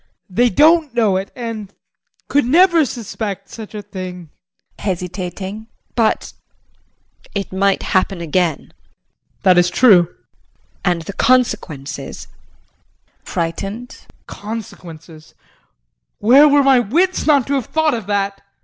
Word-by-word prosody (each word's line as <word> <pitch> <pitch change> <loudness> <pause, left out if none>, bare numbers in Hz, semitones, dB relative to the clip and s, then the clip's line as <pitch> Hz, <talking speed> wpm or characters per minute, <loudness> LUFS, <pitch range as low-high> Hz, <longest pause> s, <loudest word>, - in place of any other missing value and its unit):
They 240 +6 +3
don't 305 - +4
know 220 -5 +2
it 190 +1 -2
and 225 -5 -6 0.6
could 285 0 +2
never 335 +4 +4
suspect 210 -4 -5
such 220 -1 -10
a 210 - -6
thing. 180 -5 -8 0.5
JULIE 190 -3 -1
[Hesitating]. 185 +4 -6 0.3
But 225 -2 0 1.0
it 200 -1 -3
might 195 +1 +1
happen 190 0 0
again. 170 -1 0
JEAN. - - -22 0.7
That 180 -2 +5
is 175 0 +3
true. 195 -8 +5
JULIE. - - -27 0.7
And 175 -3 +1
the 200 - -7
consequences? 190 - -1
JEAN - - -34
[Frightened]. 195 +8 -5 0.2
Consequences 170 -7 -9 0.8
where 270 +8 +6
were 285 0 +4
my 270 -2 +5
wits 335 - 0
not 285 -5 +4
to 280 - -2
have 265 -5 -1
thought 315 -2 +1
of 225 -5 -4
that! 200 -1 -1
205 Hz, 125 wpm, -18 LUFS, 185-250 Hz, 1.0 s, where